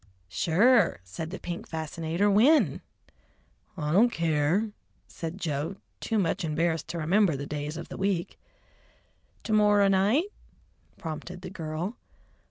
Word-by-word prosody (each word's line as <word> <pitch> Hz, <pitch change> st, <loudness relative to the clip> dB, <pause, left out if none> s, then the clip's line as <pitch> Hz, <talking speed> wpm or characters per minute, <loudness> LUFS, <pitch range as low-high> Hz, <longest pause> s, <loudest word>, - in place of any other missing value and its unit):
"Sure," 200 Hz, -, +3 dB
said 125 Hz, -, -6 dB
the 190 Hz, -, -6 dB
pink 175 Hz, -1 st, -6 dB
fascinator. 160 Hz, +4 st, -2 dB
"When?" 235 Hz, +10 st, +4 dB, 1.0 s
"I 150 Hz, -2 st, -2 dB
don't 215 Hz, +8 st, +5 dB
care," 165 Hz, +4 st, +1 dB, 0.4 s
said 165 Hz, +2 st, -6 dB
Joe, 160 Hz, 0 st, -3 dB, 0.2 s
too 225 Hz, -, -1 dB
much 190 Hz, -1 st, 0 dB
embarrassed 160 Hz, 0 st, 0 dB
to 170 Hz, -, -5 dB
remember 170 Hz, +1 st, +2 dB
the 140 Hz, +1 st, -5 dB
days 150 Hz, +2 st, -4 dB
of 170 Hz, -, -7 dB
the -, -, -7 dB
week. 190 Hz, -3 st, -1 dB, 1.0 s
"To 220 Hz, -, -2 dB
morrer 205 Hz, -1 st, +5 dB
night?" 200 Hz, -, +3 dB, 0.7 s
prompted 175 Hz, +3 st, -7 dB
the 185 Hz, -, -7 dB
girl. 165 Hz, +5 st, -4 dB
175 Hz, 130 wpm, -28 LUFS, 160-205 Hz, 1.0 s, don't